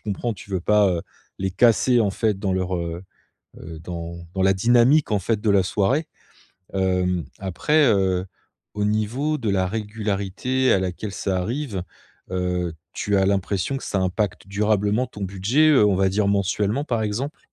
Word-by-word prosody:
comprends 110 +3 -3
tu 100 +1 -13
veux 95 -2 -1
pas, 105 +3 +4
heu, 85 -2 -1 0.4
les 95 0 -1
casser 120 +4 +4
en 105 -3 +2
fait 105 0 0
dans 95 -1 -1
leur, 95 0 -1
heu 85 0 -4 0.6
heu, 80 -1 -9
dans 85 0 -7
dans 95 - -2
la 95 +1 +4
dynamique 120 +8 +4
en 105 - +2
fait 105 +3 -1
de 110 - +1
la 100 -2 +4
soirée. 120 - 0 0.7
Hem, 90 -2 +1
après, 145 - +1
heu, 95 -4 +2 0.5
au 105 0 -1
niveau 115 +9 0
de 115 - -3
la 95 -1 +1
régularité 105 +4 -1
à 95 - +3
laquelle 95 +3 -4
ça 95 -1 -1
arrive, 110 0 -3 0.5
heu, 90 -2 -1 0.2
tu 100 -1 -1
as 95 - +3
l'impression 100 +5 0
que - - -9
ça 100 - -1
impacte 95 0 -2
durablement 105 +3 +1
ton 105 -4 -10
budget, 100 +11 +2
heu, 130 -8 +5
on 100 - +3
va 95 0 +3
dire 100 +1 +1
mensuellement 100 +6 0
par 120 -6 -1
exemple? 120 +8 -3
100 Hz, 175 wpm, -23 LUFS, 95-115 Hz, 0.7 s, heu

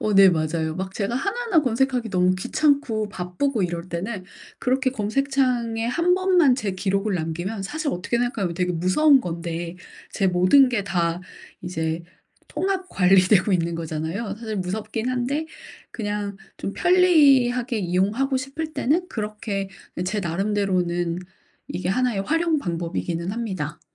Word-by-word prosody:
어 210 -1 0
네 195 0 +8
맞아요. 160 -1 0
막 190 0 -5
제가 215 +3 -2
하나하나 400 - +1
검색하기 250 -2 0
너무 185 -1 +3
귀찮고 245 -2 +1
바쁘고 200 +5 -2
이럴 175 0 -3
때는 185 +3 -4 0.3
그렇게 260 0 +1
검색창에 245 -1 0
1 335 +8 +2
번만 365 -8 +4
제 215 -6 -2
기록을 195 +2 -1
남기면 175 +5 -3
사실 305 +9 -3
어떻게 185 +5 -2
생각하면 220 -8 -1
되게 180 0 0
무서운 255 - +4
건데 170 -1 -4 0.3
제 195 - 0
모든 185 +10 +5
게 240 - -1
다 170 -2 0 0.4
이제 160 -2 -2 0.5
통합 380 -1 -2
관리되고 185 +2 +4
있는 170 -2 +1
거잖아요. 165 +6 -3
사실 220 -2 -5
무섭긴 215 +5 -3
한데 260 +5 -1 0.4
그냥 205 -2 -3 0.2
좀 200 - -4
편리하게 275 -10 +4
이용하고 205 +9 +1
싶을 275 +5 -4
때는 345 +7 +1
그렇게 210 -2 -4 0.4
제 205 +3 -1
나름대로는 180 -2 0 0.5
이게 185 - -3
1 250 +4 +1
의 195 - -1
활용 325 +6 +1
방법이기는 170 -3 -3
합니다. 185 -9 -4
205 Hz, 310 characters per minute, -23 LUFS, 180-260 Hz, 0.5 s, 네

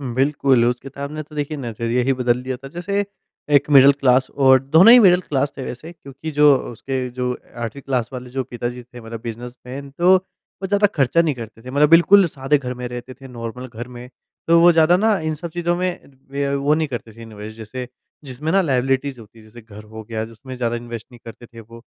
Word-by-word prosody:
बिल्कुल 135 -2 +2
उस 120 0 0
किताब 140 +1 -8
ने 155 0 -5
तो 150 +1 -16
देखिए 150 +1 -3
नज़रिया 120 -1 -2
ही 135 +2 +2
बदल 125 -1 0
दिया 130 0 -4
था 135 +2 -11
जैसे 200 +7 -2 0.5
एक 140 +1 +3
मिडल 140 0 +8
क्लास 130 -2 +2
और 130 -1 +4
दोनों 160 +10 +7
ही 250 - +9
मिडल 180 -4 +5
क्लास 140 -4 -1
थे 135 - -5
वैसे 140 +7 -8
क्योंकि 150 -1 -9
जो 150 -1 +5 0.2
उसके 130 +2 -4
जो 125 0 -3 0.2
8वीं 120 +3 -6
क्लास 125 -4 -2
वाले 125 -1 -7
जो 130 +1 -3
पिताजी 120 0 -5
थे 125 0 -13
मतलब 115 0 -8
बिज़नेसमैन 125 +4 -8
तो 175 +2 +4 0.5
वो 190 - -3
ज़्यादा 205 +1 +3
ख़र्चा 140 +3 +3
नहीं 160 -3 0
करते 115 -1 -10
थे। 125 - -10
मतलब 145 +2 +3
बिल्कुल 180 +4 +6
सादे 140 -1 0
घर 125 -2 -5
में 125 0 -6
रहते 125 +1 -8
थे, 135 +1 -13
नॉर्मल 125 +1 -7
घर 120 0 -8
में 125 0 -11 0.4
तो 170 0 +5
वो 175 - +7
ज़्यादा 165 +2 +4
ना 215 0 +2
इन 155 -1 -2
सब 170 +3 -7
चीज़ों 175 0 -1
में 180 0 -2 0.3
वे 140 +1 -2
अ, 140 - -1
वो 140 +2 +1
नहीं 155 -1 0
करते 120 -3 -7
थे 115 - -14
इन्वेस्ट 110 -1 -10
जैसे 120 +3 -7 0.4
जिसमें 145 +4 -4
ना 195 +2 +4
लायबिलिटीज़ 135 -2 0
होती 110 0 -16
है - - -16
जैसे 115 +2 -14
घर 105 -1 -13
हो 110 +1 -10
गया 110 0 -4
जिसमें 120 +4 -11
ज़्यादा 120 -1 -1
इन्वेस्ट 120 -1 -7
नहीं 120 - -15
करते 115 +1 -11
थे 115 -1 -14
वो 115 +1 -13
130 Hz, 225 wpm, -20 LUFS, 120-150 Hz, 0.5 s, ही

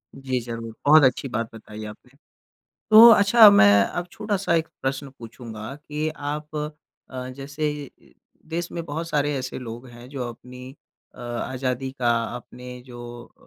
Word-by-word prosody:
जी, 130 -2 -2
ज़रूर, 115 -1 -7
बहुत 155 0 +7
अच्छी 130 +1 +2
बात 115 0 -3
बताई 110 0 -10
आपने। 105 +4 -12 0.8
तो 225 +2 +11
अच्छा 215 +1 +8
मैं 100 - +6
अब 175 0 -4
छोटा-सा 200 -5 -1
एक 165 -1 +1
प्रश्न 135 +1 -2
पूछूँगा 115 0 -9
कि 150 +1 -4
आप 150 +1 -5 0.5
अ, 130 0 -6
जैसे 145 +2 -3
ये 145 -2 -10 0.3
देश 170 +1 -3
में 170 - -4
बहुत 165 +2 -5
सारे 145 -1 0
ऐसे 130 - -5
लोग 120 +1 -8
हैं 120 +1 -13
जो 130 -3 -5
अपनी 125 +2 -11 0.4
अ, - - -19
आज़ादी 125 +2 -3
का, 125 -3 0 0.3
अपनें 125 +1 -11
जो 120 -1 -11
130 Hz, 150 wpm, -24 LUFS, 120-150 Hz, 0.8 s, तो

